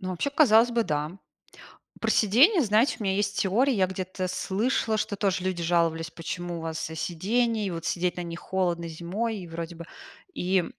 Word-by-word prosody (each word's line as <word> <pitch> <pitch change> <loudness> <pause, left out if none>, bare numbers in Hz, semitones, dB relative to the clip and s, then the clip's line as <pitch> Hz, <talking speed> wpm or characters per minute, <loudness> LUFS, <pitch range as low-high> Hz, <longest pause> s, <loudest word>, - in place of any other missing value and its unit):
Ну 185 - -4
вообще, 185 +10 -2
казалось 245 -5 +5
бы, 235 -1 +1
да. 150 +3 -3 0.8
Про - - 0
сидения, 275 - +5
знаете, 220 +3 +3
у - - -3
меня 190 -1 +1
есть 200 +1 -1
теория. 245 +8 +2
Я 190 -4 +3
где-то 185 0 -4
слышала, 220 +4 0
что 210 - -2
тоже 190 -3 0
люди 185 -2 -2
жаловались, 165 -1 +1
почему 175 +1 -5
у - - -7
вас, 160 -1 -4
э, 160 - -7
сидение, 215 +7 0
и - - -2
вот 165 -1 -5
сидеть 180 0 -1
на 180 - -3
них 170 0 -7
холодно 175 -3 -1
зимой, 190 +8 -3
и 180 - -8
вроде 165 0 -6
бы. 170 - -8 0.5
И 180 0 +1
185 Hz, 195 wpm, -27 LUFS, 170-215 Hz, 0.8 s, казалось